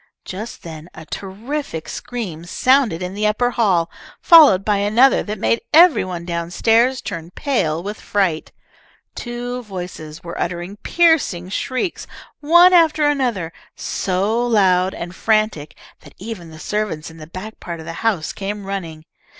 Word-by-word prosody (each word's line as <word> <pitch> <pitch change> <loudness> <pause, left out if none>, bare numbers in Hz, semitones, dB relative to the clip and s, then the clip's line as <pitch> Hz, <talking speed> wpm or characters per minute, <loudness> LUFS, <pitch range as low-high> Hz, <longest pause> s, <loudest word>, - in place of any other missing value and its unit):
Just 215 +5 -7
then 160 0 -9
a - - -10
terrific 200 - -5
scream 195 -10 -6
sounded 245 -4 +2
in 180 +1 -5
the 210 +1 0
upper 245 +3 +1
hall, 190 -8 +1 0.3
followed 295 - +7
by 210 -1 +2
another 215 +7 +4
that 210 +1 -5
made 230 - +1
every 335 +2 +6
one 180 -2 -6
down 170 -1 -3
stairs 235 +7 +2
turn 170 -5 -6
pale 175 - -1
with 205 +2 -6
fright. 185 -6 -1 0.6
Two 245 +1 -5
voices 175 -7 -8
were 170 0 -6
uttering 175 +3 -4
piercing 295 - +2
shrieks, 255 - -3 0.3
one 345 +4 +6
after 315 -3 +4
another, 240 - -1 0.2
so 200 +5 -1
loud 190 -5 +2
and 175 +1 -6
frantic 215 -8 0 0.2
that - - -17
even 195 -5 -8
the 160 - -12
servants 180 -4 -3
in 160 - -15
the 155 -1 -10
back 185 +6 -9
part 170 -1 -7
of 160 - -9
the 165 - -6
house 205 -9 0
came 200 0 -5
running. 165 -5 -6
200 Hz, 150 wpm, -19 LUFS, 170-240 Hz, 0.6 s, followed